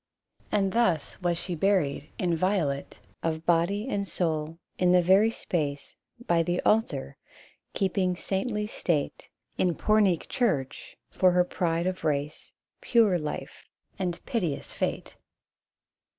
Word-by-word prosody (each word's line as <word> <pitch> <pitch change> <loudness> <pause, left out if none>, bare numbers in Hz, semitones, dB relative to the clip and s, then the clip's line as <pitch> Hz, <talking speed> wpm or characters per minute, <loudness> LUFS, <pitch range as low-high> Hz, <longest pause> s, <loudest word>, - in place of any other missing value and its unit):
And 195 -2 +2
thus 185 -8 +1
was 175 -1 +1
she 175 +1 -4
buried, 165 -5 +1
inviolate 170 -5 0 0.2
Of 160 0 -2
body 175 +6 +2
and 200 -6 -2
soul, 160 -3 -2 0.2
in 180 -1 +4
the 180 - +6
very 195 +5 +5
space 145 -10 -3 0.3
By 170 -1 +3
the 175 +2 0
altar; 225 +1 +1 0.6
keeping 190 -2 +1
saintly 210 +4 -2
state 170 -7 -2 0.3
In 175 -3 +2
Pornic 205 -6 +2
church, 160 - -1
for 185 -1 +3
her 180 0 +5
pride 170 -1 -1
of 185 0 -2
race, 145 0 -2 0.3
Pure 215 -7 +3
life 150 -1 -6 0.3
and 175 -2 -2
piteous 175 - -2
fate. - - -3
180 Hz, 120 wpm, -27 LUFS, 165-195 Hz, 0.6 s, the